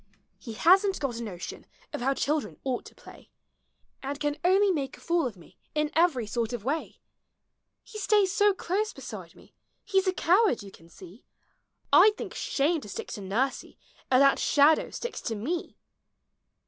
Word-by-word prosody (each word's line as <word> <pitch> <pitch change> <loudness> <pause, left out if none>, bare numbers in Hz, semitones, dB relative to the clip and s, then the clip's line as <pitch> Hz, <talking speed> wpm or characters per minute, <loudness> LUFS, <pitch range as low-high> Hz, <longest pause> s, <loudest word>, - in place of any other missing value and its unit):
He 230 - -8
hasn't 375 - +4
got 250 -5 -3
a - - -4
notion 180 -6 -8 0.3
of - - -4
how 270 +2 +1
children 300 +2 -1
ought 255 -2 -2
to - - -14
play, - - -15 0.7
And 280 +1 -5
can 295 -1 -1
only 385 +3 +4
make 275 -6 -3
a - - -18
fool 335 -4 0
of 215 -6 -9
me 170 - -19 0.2
in 300 0 0
every 320 -8 +2
sort 230 +2 -2
of 235 -4 -5
way. 290 +7 -3 0.9
lie 430 - -5
stays 405 -2 +3
so 410 0 +4
close 395 +3 -2
beside - - -9
me, - - -19 0.3
he 385 -2 +2
's 380 - -7
a 375 - +2
coward 370 - +2
you 195 - -11
can 165 -2 -18
see; 185 +5 -14 0.7
I - - +9
M 430 - +4
think - - -7
shiinie 305 +3 0
to 210 - -10
stick - - -6
to 205 - -6
nursie 230 +8 -2 0.3
as 255 0 +5
that 275 - +4
shadow 295 +2 +4
sticks 480 - -6
to 225 - -3
ine! 310 +12 -4
290 Hz, 185 wpm, -27 LUFS, 235-370 Hz, 0.9 s, I